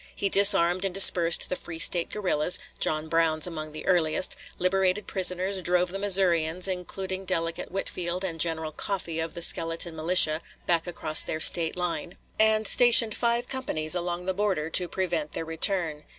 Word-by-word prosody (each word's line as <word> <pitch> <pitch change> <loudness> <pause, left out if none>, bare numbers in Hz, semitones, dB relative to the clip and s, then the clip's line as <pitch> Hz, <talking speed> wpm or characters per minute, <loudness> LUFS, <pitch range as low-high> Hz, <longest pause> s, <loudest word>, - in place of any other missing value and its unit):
He 200 - -2
disarmed 195 -3 +5
and 190 -2 -3
dispersed 175 -3 +5
the - - -4
free 170 -2 -8
State 170 +1 +2
guerrillas, 180 -5 0 0.2
John 155 0 -3
Brown's 160 -1 0
among 155 -3 -6
the 155 - -10
earliest, 175 -1 +1 0.2
liberated 190 +2 -1
prisoners, 185 +1 -2
drove 180 0 -1
the 195 - -7
Missourians, 180 -3 +1
including 190 +1 -6
delegate 165 -3 -4
Whitfield 180 -1 -5
and 165 -4 -6
General 160 -1 -2
Coffee 170 -1 -6
of 160 0 -5
the 170 - -4
skeleton 165 -1 -2
militia, 160 -1 +3 0.2
back 170 0 -1
across 155 -3 +3
their 155 - -4
State 165 +1 +3
line, 175 -1 -5 0.2
and 220 0 +1
stationed 235 -2 +6
five 235 0 -2
companies 155 -13 -3
along 175 0 -3
the 190 - -3
border 185 -6 -3
to 180 - 0
prevent 170 -5 -4
their 165 - -4
return. 160 -1 -2
175 Hz, 165 wpm, -24 LUFS, 165-190 Hz, 0.2 s, stationed